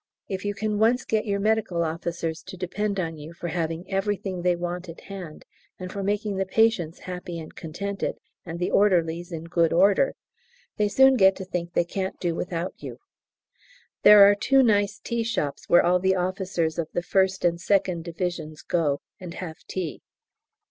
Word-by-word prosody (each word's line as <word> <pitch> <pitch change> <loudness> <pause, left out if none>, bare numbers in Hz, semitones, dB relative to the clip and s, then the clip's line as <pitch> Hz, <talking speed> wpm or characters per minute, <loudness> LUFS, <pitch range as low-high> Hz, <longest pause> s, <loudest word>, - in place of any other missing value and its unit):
If 190 -1 -4
you 205 0 -1
can 210 0 -1
once 235 +4 +3
get 220 0 0
your 200 -1 0
Medical 215 -5 +1
Officers 165 0 -3
to 185 - -8
depend 200 +3 -2
on 165 -3 -3
you 155 +2 -9
for 170 0 -5
having 165 +1 -3
everything 195 -1 -2
they 180 0 +2
want 175 +1 -4
at 165 - -10
hand, 185 -6 -9 0.3
and 185 0 -7
for 200 - -4
making 205 0 -1
the 195 - 0
patients 190 -6 +1
happy 180 -2 -6
and 160 -1 -9
contented, 200 +5 -4 0.3
and 170 -1 -6
the 175 - -1
orderlies 175 -3 +2
in 165 -1 -5
good 170 -1 +1
order, 195 +8 +4 0.6
they 210 - +2
soon 265 +5 +5
get 190 -2 +6
to 190 - -7
think 175 -1 -4
they 175 - +2
can't 190 +2 -4
do 175 -2 -1
without 170 +1 -3
you. - - -8 1.0
There 205 -1 +9
are 205 - +6
two 265 +6 +3
nice 205 -2 +2
tea 235 0 -3
shops 150 -11 -3
where 175 - +6
all 180 +1 +4
the 190 +1 +2
officers 180 -3 -1
of 165 - -1
the 175 - 0
1st 190 0 +1
and 170 0 -1
2nd 185 -2 +1
Divisions 165 -2 -4
go 150 -5 0 0.2
and 175 -2 -8
have 165 -4 -7
tea. 180 -5 -4
180 Hz, 185 wpm, -25 LUFS, 170-200 Hz, 1.0 s, There